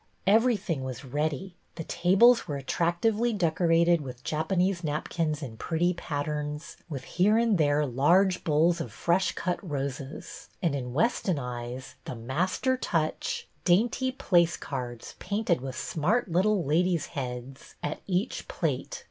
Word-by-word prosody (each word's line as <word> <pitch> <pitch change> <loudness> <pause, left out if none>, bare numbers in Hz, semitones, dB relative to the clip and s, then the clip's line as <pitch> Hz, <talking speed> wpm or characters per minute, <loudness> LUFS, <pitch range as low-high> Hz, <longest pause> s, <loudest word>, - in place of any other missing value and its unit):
Every 225 +4 +4
tliing 170 -8 -3
was 130 +1 -6
ready. 150 +6 -2 0.2
The 165 - -5
tables 200 +10 +4
were 145 -2 -3
attrac 170 +5 -1
tively 225 0 +2
decorated 170 -1 +3
with 130 -2 -8
Japanese 175 +4 0
napkins 155 0 -2
in 115 -5 -7
pretty 175 +6 0
patterns, 150 -1 -4
with 135 -5 -5
here 200 +9 +2
and 230 -5 +3
there 145 0 +3
large 175 +9 +3
bowls 165 +3 +3
of - - -5
fresh 175 +3 +1
cut 180 -1 -2
roses 140 -3 -5
and, 170 -6 0
in 125 -3 -4
Weston 190 -2 +1
eyes, 125 0 -5
the - - -5
master 170 - 0
touch, 160 -9 -1
— - - -38
dainty 235 +8 +2
place 175 -9 +2
cards, 125 -4 -6
painted 200 - 0
with 130 -1 -5
smart 195 +11 0
little 190 +2 +2
ladies' 170 +3 +2
heads, 130 0 -6
at 150 - -3
each 190 +5 -1
plate. - - -2
165 Hz, 145 wpm, -28 LUFS, 140-190 Hz, 0.2 s, Every